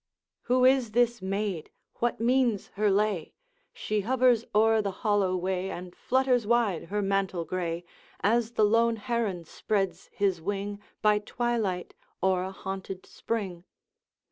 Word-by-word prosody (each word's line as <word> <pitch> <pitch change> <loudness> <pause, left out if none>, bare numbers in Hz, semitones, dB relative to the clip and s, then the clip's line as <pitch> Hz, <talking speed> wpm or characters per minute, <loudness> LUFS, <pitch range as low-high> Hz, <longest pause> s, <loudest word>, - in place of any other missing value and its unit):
'Who 250 0 +4
is 255 -4 +4
this 240 -1 +2
maid? 195 -3 -2 0.3
what 240 0 0
means 240 -3 +2
her 210 +1 +1
lay? 200 -4 0 0.4
She 210 -1 -2
hovers 245 +1 +3
o'er 220 +1 +5
the 200 - -1 0.2
hollow 200 -3 +2
way, 185 +1 -1
And 180 -1 -7
flutters 255 -3 +1
wide 230 -7 +2
her 205 +4 -2
mantle 195 -3 0
gray, 175 -1 -3 0.4
As 230 +2 +1
the 215 - +4
lone 230 +2 +3
heron 220 -5 -2
spreads 195 +3 -2
his 195 -6 0
wing, 200 +2 -3 0.2
By 210 -1 +5
twilight, 215 -5 -2 0.3
o'er 190 -1 +3
a 190 +1 -4
haunted 190 -1 -6
spring.' 190 -7 -4
205 Hz, 140 wpm, -28 LUFS, 190-235 Hz, 0.4 s, o'er